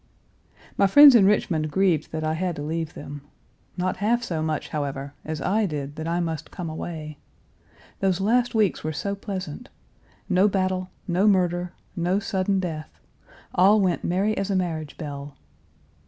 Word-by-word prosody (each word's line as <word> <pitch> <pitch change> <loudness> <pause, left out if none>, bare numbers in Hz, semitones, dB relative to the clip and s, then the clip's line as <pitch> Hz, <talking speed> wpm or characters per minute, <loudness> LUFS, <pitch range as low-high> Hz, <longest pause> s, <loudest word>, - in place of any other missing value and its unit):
My 200 - +6
friends 285 +7 +9
in 210 -5 +6
Richmond 165 -6 +1
grieved 170 -2 +1
that 160 0 -3
I 155 0 0
had 175 +1 -2
to 145 - -5
leave 160 +1 -3
them 145 0 -8 0.6
not 185 +1 -1
half 235 +5 +1
so 165 -9 -2
much, 155 -1 -2
however, 140 -1 -4
as 155 0 -5
I 210 +2 +2
did 145 -3 -5
that 160 +1 -5
I 170 +1 0
must 160 -3 -3
come 170 -4 -6
away. 155 -2 -6 0.8
Those 190 -2 +1
last 235 +5 +2
weeks 210 -5 +2
were 155 +1 -2
so 200 +7 -2
pleasant. 190 -6 -6 0.6
No 185 +3 +4
battle, 185 -2 -1 0.2
no 185 +3 +2
murder, 180 -3 +2 0.2
no 175 +3 +1
sudden 195 -1 0
death, 160 -5 -5 0.5
all 200 +4 +5
went 185 -4 +1
merry 195 +5 +1
as 195 +1 -2
a 195 - +1
marriage 160 -5 -2
bell. 140 -2 -7
175 Hz, 165 wpm, -24 LUFS, 155-195 Hz, 0.8 s, friends